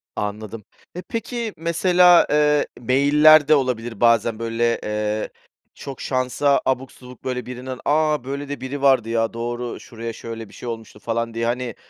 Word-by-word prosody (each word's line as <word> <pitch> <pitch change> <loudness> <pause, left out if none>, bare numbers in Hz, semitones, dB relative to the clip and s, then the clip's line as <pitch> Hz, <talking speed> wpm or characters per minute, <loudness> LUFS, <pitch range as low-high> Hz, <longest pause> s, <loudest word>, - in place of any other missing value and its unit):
Anladım. 105 +1 -5 0.3
Eee, 180 - -6
peki, 230 -1 -4
mesela, 175 +2 +4
eee, 150 0 +3
mail'ler 145 +4 +5
de 155 - +6
olabilir 120 -5 -2
bazen, 115 -1 +3
böyle, 115 0 0
eee, 105 0 -2 0.4
çok 135 -2 -9
şansa 130 +2 +1
abuk 130 0 -1
subuk, 125 -1 -15
böyle, 125 -1 -3
birinin 125 +1 -7
"A, 150 -2 +2
böyle 140 +2 -5
de 145 -4 -5
biri 135 +2 -5
vardı, 130 -5 +3
ya, 115 -1 0
doğru 120 +1 -4
şuraya 115 0 -7
şöyle 115 -1 -8
bir - - -18
şey 120 - -7
olmuştu" 115 -2 -8
falan 115 0 -3
diye, 115 0 -2
hani, 120 -1 -2
125 Hz, 160 wpm, -21 LUFS, 115-145 Hz, 0.4 s, de